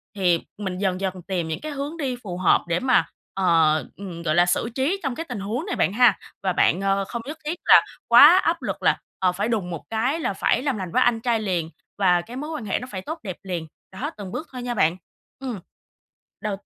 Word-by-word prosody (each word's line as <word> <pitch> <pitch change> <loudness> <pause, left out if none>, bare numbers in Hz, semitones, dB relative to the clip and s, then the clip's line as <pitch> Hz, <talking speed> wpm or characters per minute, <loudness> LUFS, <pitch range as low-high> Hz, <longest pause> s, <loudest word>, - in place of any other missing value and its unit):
thì 180 -4 +2 0.2
mình 190 -3 -4
dần 190 -1 -1
dần 190 -1 -3
tìm 180 -4 -1
những 160 - -3
cái 310 - -5
hướng 285 +3 -4
đi 270 -6 -2
phù 180 -4 -5
hợp 185 -2 +3
để 170 0 +1
mà 255 -1 +3 0.3
ờ, 165 -5 +3 0.2
ừm, 180 -4 -8
gọi 155 -2 +1
là, 175 0 +5
xử 180 +6 0
trí 295 +9 0
trong 260 - -2
cái 325 - -4
tình 245 -4 -4
huống 220 - -3
này 395 - -3
bạn 190 - +1
ha 245 +3 +5 0.3
và 190 -2 +1
bạn, 175 +1 +3
ờ, 195 0 +1
không 235 +4 -5
nhất 300 +3 -6
thiết 315 +3 -1
là - - +8 0.3
quá 290 +9 +9
áp 335 0 +1
lực - - -4
là, - - +4 0.2
ờ, 185 -1 +3
phải 200 +4 -2
đùng 215 -6 -1
một 170 -3 -6
cái 250 +8 0
là 250 - -1
phải 195 - +1
làm 275 -5 0
lành 185 -3 -5
với 255 - +2
anh 235 -2 +2
trai 235 -1 +1
liền 180 -6 -1 0.3
và 180 -3 +4
cái 230 +7 -10
mối 300 +3 -5
quan 305 -8 -5
hệ 190 - 0
nó 250 - -7
phải 190 - -5
tốt 315 - -6
đẹp 185 -4 -5
liền, 175 -4 -4 0.2
đó, 190 - -4
từng 200 -3 -7
bước 315 - -5
thôi 250 -2 -6
nha 245 0 -2
bạn. 170 -5 +2 0.4
Ừm. 255 -6 -5 0.8
Đầu 210 -2 -2
200 Hz, 245 wpm, -24 LUFS, 180-255 Hz, 0.8 s, quá